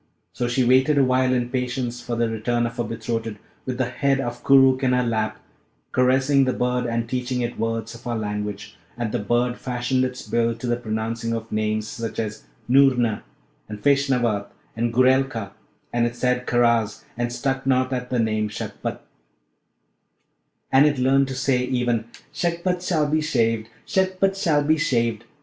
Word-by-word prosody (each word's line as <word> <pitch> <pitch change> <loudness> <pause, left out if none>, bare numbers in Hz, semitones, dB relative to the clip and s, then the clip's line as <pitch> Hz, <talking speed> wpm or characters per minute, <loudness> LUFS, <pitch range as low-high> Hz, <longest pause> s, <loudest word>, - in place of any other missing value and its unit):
So 120 - -2
she 125 +2 +1
waited 130 +4 +4
awhile 130 -1 +3
in 125 -1 0
patience 125 -1 -2
for 120 - -4
the 115 0 +1
return 120 +2 -1
of 115 +1 -5
her 120 - 0
betrothed, 115 -1 -4 0.3
with 125 -1 -2
the 130 - +1
head 135 0 +1
of 120 -2 -4
Koorookh 135 -1 +5
in 130 -1 +2
her 125 0 +2
lap, 110 -2 -1 0.5
caressing 130 +2 +3
the 130 - +1
bird, 125 0 0
and 115 0 -1
teaching 125 0 -2
it 120 0 -3
words 115 0 -2
of 115 - -11
our 120 -1 -1
language; 105 -1 -4 0.2
and 120 -3 -2
the 120 - -1
bird 120 +3 0
fashioned 125 +1 -1
its 125 -3 -4
bill 115 +1 +1
to 120 - -8
the 120 0 +1
pronouncing 115 0 -3
of 115 0 -5
names, 110 0 -1
such 115 0 -5
as 105 - -4 0.2
'Noorna' 125 -4 +4 0.5
and 105 -1 -6
'Feshnavat,' 125 -7 +2 0.3
and 115 +1 0
'Goorelka'; 130 -4 +2 0.4
and 120 0 +2
it 120 - -6
said 125 +1 0
'Karaz,' 115 -3 +2
and 120 0 -2
stuck 135 +2 -2
not 130 0 +2
at 125 0 -3
the 125 - 0
name 110 -2 0
'Shagpat,' 105 - -5 1.7
and 135 +3 +6
it 145 -2 0
learnt 135 +2 +3
to 135 - -5
say 130 -1 +1
even 120 -3 0 0.3
'Shagpat 175 +1 -1
shall 160 -5 +1
be 155 +1 +1
shaved! 115 -7 0 0.2
Shagpat 190 +1 +1
shall 160 -6 +2
be 155 +2 +2
shaved!' 115 -6 0
125 Hz, 170 wpm, -23 LUFS, 115-130 Hz, 1.7 s, and